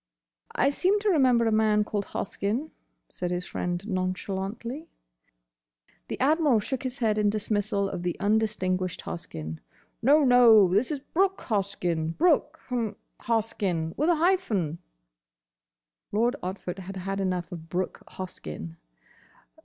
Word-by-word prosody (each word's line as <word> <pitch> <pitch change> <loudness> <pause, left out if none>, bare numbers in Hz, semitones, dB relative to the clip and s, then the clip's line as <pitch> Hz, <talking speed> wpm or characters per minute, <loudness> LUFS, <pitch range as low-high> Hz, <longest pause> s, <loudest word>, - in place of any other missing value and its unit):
"I 275 - +3
seem 375 +8 +2
to 425 - +2
remember 255 -7 +4
a 225 - +2
man 215 -1 +3
called 205 -1 -3
Hoskyn," 225 +11 -3 0.4
said 180 - -4
his 180 0 -2
friend 180 +3 -3
nonchalantly. 195 - -3 1.2
The - - -5
Admiral 290 -3 +4
shook 265 +5 -3
his 260 -1 -4
head 220 -4 +1
in 210 -1 +3
dismissal 205 -1 0
of 180 - -4
the 175 -1 -2
undistinguished 200 -4 0
Hoskyn. 80 - -6 0.4
"No, 290 +5 +5
no. 230 -7 +7
This 210 +6 +2
is 290 -3 -3
Brooke 385 +2 +2
Hoskyn; 180 -6 -1
Brooke—h'm—Hoskyn; 225 - -1
with 305 +5 +1
a 345 - +5
hyphen." 270 - +1 1.3
Lord 235 +5 +2
Otford 185 0 -5
had 190 +1 -7
had 195 +2 -3
enough 185 -3 -1
of 165 -2 -8
Brooke 180 +1 -2
Hoskyn. 80 - -7
210 Hz, 125 wpm, -27 LUFS, 185-250 Hz, 1.3 s, no